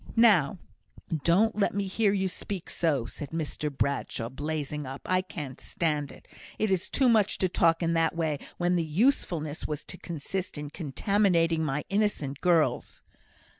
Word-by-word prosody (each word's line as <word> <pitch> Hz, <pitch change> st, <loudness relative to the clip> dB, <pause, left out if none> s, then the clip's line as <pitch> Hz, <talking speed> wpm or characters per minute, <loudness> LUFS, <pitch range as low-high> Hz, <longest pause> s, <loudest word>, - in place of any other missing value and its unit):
"Now, 200 Hz, -10 st, +5 dB, 0.7 s
don't 205 Hz, +7 st, +4 dB
let 205 Hz, -2 st, +1 dB
me 200 Hz, -1 st, 0 dB
hear 200 Hz, +2 st, +2 dB
you 190 Hz, -1 st, +1 dB
speak 185 Hz, 0 st, -6 dB
so," 145 Hz, -8 st, +1 dB
said 145 Hz, +3 st, -7 dB
Mr 155 Hz, -1 st, -3 dB
Bradshaw, 140 Hz, -4 st, -2 dB
blazing 150 Hz, +1 st, -4 dB
up. 135 Hz, +1 st, -7 dB
"I 185 Hz, 0 st, +2 dB
can't 145 Hz, -8 st, -7 dB
stand 150 Hz, -4 st, -1 dB
it. -, -, -16 dB, 0.3 s
It 215 Hz, -2 st, 0 dB
is 185 Hz, -2 st, 0 dB
too 265 Hz, -, +3 dB
much 220 Hz, -4 st, +3 dB
to 185 Hz, -, +2 dB
talk 165 Hz, -1 st, +2 dB
in 165 Hz, 0 st, +1 dB
that 165 Hz, -1 st, +2 dB
way 160 Hz, -4 st, -1 dB, 0.2 s
when 175 Hz, 0 st, +2 dB
the 170 Hz, -, +1 dB
usefulness 160 Hz, -, 0 dB
was 150 Hz, -1 st, -4 dB
to -, -, -8 dB
consist 170 Hz, +2 st, -4 dB
in 145 Hz, 0 st, -6 dB
contaminating 165 Hz, +1 st, +1 dB
my 145 Hz, -1 st, -1 dB
innocent 195 Hz, -9 st, 0 dB
girls." 170 Hz, -3 st, +1 dB
165 Hz, 165 wpm, -28 LUFS, 150-190 Hz, 0.7 s, Now